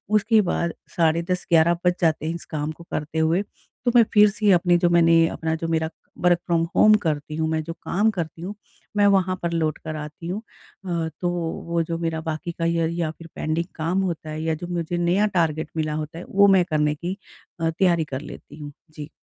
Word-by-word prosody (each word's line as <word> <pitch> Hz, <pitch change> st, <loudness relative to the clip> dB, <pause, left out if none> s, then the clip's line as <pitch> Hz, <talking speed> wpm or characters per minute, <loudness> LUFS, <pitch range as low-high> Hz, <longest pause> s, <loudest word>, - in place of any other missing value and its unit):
उसके 215 Hz, +1 st, +4 dB
बाद 170 Hz, -1 st, -1 dB, 0.2 s
10:30-11:00 170 Hz, 0 st, +2 dB
बज 180 Hz, -, +4 dB
जाते 160 Hz, -2 st, +1 dB
हैं 165 Hz, +1 st, -2 dB
इस 170 Hz, -, -9 dB
काम 150 Hz, -1 st, -3 dB
को 165 Hz, +2 st, -12 dB
करते 150 Hz, +1 st, -3 dB
हुए, 160 Hz, +4 st, +2 dB
तो 225 Hz, +4 st, -6 dB
मैं 240 Hz, -, +8 dB
फिर 210 Hz, -1 st, +7 dB
से 205 Hz, 0 st, +2 dB
अपनी 175 Hz, 0 st, +4 dB
जो 175 Hz, 0 st, +2 dB
मैंने 165 Hz, -1 st, +5 dB
अपना 160 Hz, 0 st, -2 dB
जो 165 Hz, +1 st, -4 dB
मेरा 160 Hz, -1 st, 0 dB, 0.3 s
वर्क 175 Hz, -1 st, +4 dB
फ्रॉम 170 Hz, -2 st, +2 dB
होम 215 Hz, -, +7 dB
करती 150 Hz, -2 st, -2 dB
हूँ 160 Hz, 0 st, 0 dB
मैं 160 Hz, 0 st, 0 dB
जो 165 Hz, +2 st, -6 dB
काम 205 Hz, +5 st, 0 dB
करती 165 Hz, -4 st, -5 dB
हूँ 190 Hz, +4 st, -5 dB, 0.4 s
मैं 205 Hz, 0 st, +5 dB
वहाँ 190 Hz, -2 st, +3 dB
पर 170 Hz, -, 0 dB
लौट 160 Hz, -2 st, 0 dB
कर 155 Hz, 0 st, -4 dB
आती 150 Hz, +2 st, -7 dB
हूँ 190 Hz, +5 st, -3 dB, 0.4 s
अ, 170 Hz, -3 st, -1 dB
तो 175 Hz, -, +1 dB, 0.4 s
वो 170 Hz, 0 st, +1 dB
जो 165 Hz, +1 st, -3 dB
मेरा 165 Hz, -1 st, -2 dB
बाकी 160 Hz, +1 st, -4 dB
का 165 Hz, 0 st, -3 dB
या 165 Hz, 0 st, +1 dB
या 170 Hz, -2 st, -2 dB
फिर 165 Hz, +1 st, -13 dB
पेंडिंग 160 Hz, +2 st, -1 dB
काम 170 Hz, +4 st, 0 dB
होता 170 Hz, -4 st, -3 dB
है 155 Hz, 0 st, -4 dB
या 160 Hz, 0 st, 0 dB
जो 175 Hz, +3 st, -7 dB
मुझे 175 Hz, -1 st, -2 dB
नया 175 Hz, +4 st, +2 dB
टारगेट 160 Hz, -2 st, 0 dB
मिला 155 Hz, -1 st, -1 dB
होता 155 Hz, +1 st, -5 dB
है -, -, -8 dB
वो 200 Hz, +1 st, +5 dB
मैं 190 Hz, -2 st, +5 dB
करने 150 Hz, -1 st, +1 dB
की 175 Hz, +5 st, -5 dB, 0.4 s
अ, 165 Hz, -, +2 dB
तैयारी 170 Hz, 0 st, +2 dB
कर 135 Hz, -2 st, -5 dB
लेती 150 Hz, -, -11 dB
हूँ। 145 Hz, -1 st, -7 dB, 0.2 s
जी। 150 Hz, -1 st, -8 dB
165 Hz, 220 wpm, -23 LUFS, 160-180 Hz, 0.4 s, मैं